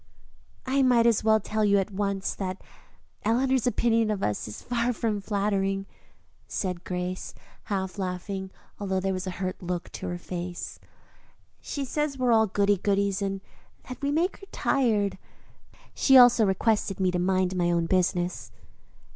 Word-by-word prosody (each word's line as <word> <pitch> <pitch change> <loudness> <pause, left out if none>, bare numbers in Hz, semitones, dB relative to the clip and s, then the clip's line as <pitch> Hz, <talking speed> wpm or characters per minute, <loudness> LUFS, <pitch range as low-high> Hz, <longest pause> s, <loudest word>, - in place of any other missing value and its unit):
"I 270 +1 +2
might 245 -3 +4
as 230 -3 +3
well 220 0 +4
tell 215 +1 -1
you 200 -1 +4
at 195 +1 -1
once 195 -1 -1
that 185 -1 -5 0.6
Eleanor's 255 +2 +2
opinion 230 -2 +2
of 205 -2 -1
us 105 0 -1
is 105 - -8
far 245 0 0
from 215 -2 -1
flattering," 195 -1 0 0.6
said 180 -3 -3
Grace, 180 0 -4 0.3
half 190 -1 -3
laughing, 190 +1 -4 0.3
although 190 -2 -1
there 190 0 -1
was 185 0 -4
a 185 - -5
hurt 185 -1 -3
look 180 -1 -4
on - - -3
her 175 - -3
face. 175 0 -6 0.8
"She 280 -1 -4
says 295 +1 -2
we 255 - -1
are 245 - +4
all 220 -1 +5
goody 200 +1 +2
goodies 200 +1 0
and 195 -1 -2 0.5
that 255 - -7
we 280 - 0
make 330 +6 +1
her 395 - -14
tired. 215 -7 +1 0.7
She 270 -1 +5
also 245 -3 +7
requested 195 0 +1
me 185 -1 +2
to 180 - -1
mind 185 0 +1
my 175 -1 +1
own 170 -1 +1
business." 180 - 0
200 Hz, 165 wpm, -27 LUFS, 185-230 Hz, 0.8 s, also